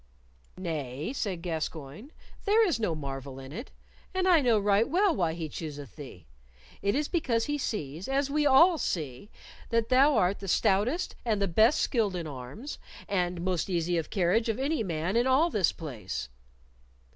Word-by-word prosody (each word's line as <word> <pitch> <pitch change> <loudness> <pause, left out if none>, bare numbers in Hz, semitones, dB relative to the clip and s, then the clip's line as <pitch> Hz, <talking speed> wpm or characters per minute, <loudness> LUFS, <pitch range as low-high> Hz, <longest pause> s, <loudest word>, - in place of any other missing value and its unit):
"Nay," 155 - -4
said 190 -10 -3
Gascoyne, 160 - -5 0.3
"there 440 +2 +5
is 340 - 0
no 190 -7 0
marvel 135 -2 -6
in 135 0 -10
it, 230 - -7 0.5
and 375 0 +1
I 345 -4 +6
know 240 -4 +4
right 205 +4 +2
well 370 +3 +3
why 170 -4 0
he 165 -1 -4
chooseth 145 -2 -7
thee. 130 - -10 0.6
It 200 +1 +1
is 295 +1 0
because 245 -10 0
he 295 0 -2
sees, 165 - -4
as 270 +1 +1
we 295 +1 +1
all 325 +5 +6
see, 155 - -3 0.4
that 230 -1 +1
thou 270 +3 +5
art 185 +2 +2
the 195 - -7
stoutest 215 - +1
and 220 -4 0
the 200 - +1
best 220 - +4
skilled 215 -7 +1
in 170 -2 -3
arms, 145 - -7 0.3
and 180 -3 -1
most 180 0 -1
easy 175 -1 0
of 160 - -5
carriage 200 +4 +1
of 225 - 0
any 285 +3 0
man 170 0 -2
in 240 +2 +3
all 295 +6 +4
this 195 -5 +2
place." 105 - -6
200 Hz, 175 wpm, -29 LUFS, 160-260 Hz, 0.6 s, I